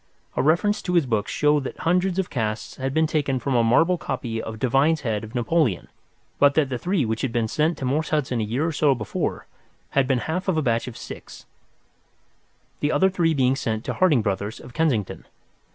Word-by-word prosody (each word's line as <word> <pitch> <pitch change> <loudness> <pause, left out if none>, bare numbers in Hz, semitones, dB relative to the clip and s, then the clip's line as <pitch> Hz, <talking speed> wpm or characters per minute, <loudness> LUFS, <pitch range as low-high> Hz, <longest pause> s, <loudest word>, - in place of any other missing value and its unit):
A - - +1
reference 175 +8 +2
to 180 - -2
his 170 -4 +4
books 110 -4 -1
showed 150 -1 +2
that - - -6
hundreds 180 +2 +1
of 190 -2 -1
casts 110 -3 -3
had 135 0 -2
been 160 +3 +2
taken 145 -4 0
from 130 +2 -2
a 120 -2 +3
marble 165 +10 +3
copy 115 -4 -3
of 110 0 -6
Devine's 135 +6 +2
head 110 -4 -2
of 110 +3 -9
Napoleon, 125 - +1 0.5
but 140 0 +5
that 150 -4 +2
the 125 -2 -3
three 180 -1 0
which 110 0 -2
had 135 - -1
been 115 -1 0
sent 155 +8 0
to 135 - -4
Morse 150 +5 0
Hudson 130 -6 0
a - - 0
year 120 +8 -1
or 165 - 0
so 145 -3 +2
before 110 -4 -3 0.5
had 135 -2 +2
been 135 -1 +2
half 180 +5 -2
of 185 -4 +1
a 155 - +1
batch 115 -1 0
of 120 - -7
six, - - -10 1.3
the 145 - 0
other 190 0 +3
three 165 -4 +1
being 130 -1 +3
sent 110 -4 -3
to - - -2
Harding 155 -11 +3
Brothers, 100 +1 -2
of 120 - -12
Kensington. 135 - -1
135 Hz, 215 wpm, -24 LUFS, 115-160 Hz, 1.3 s, but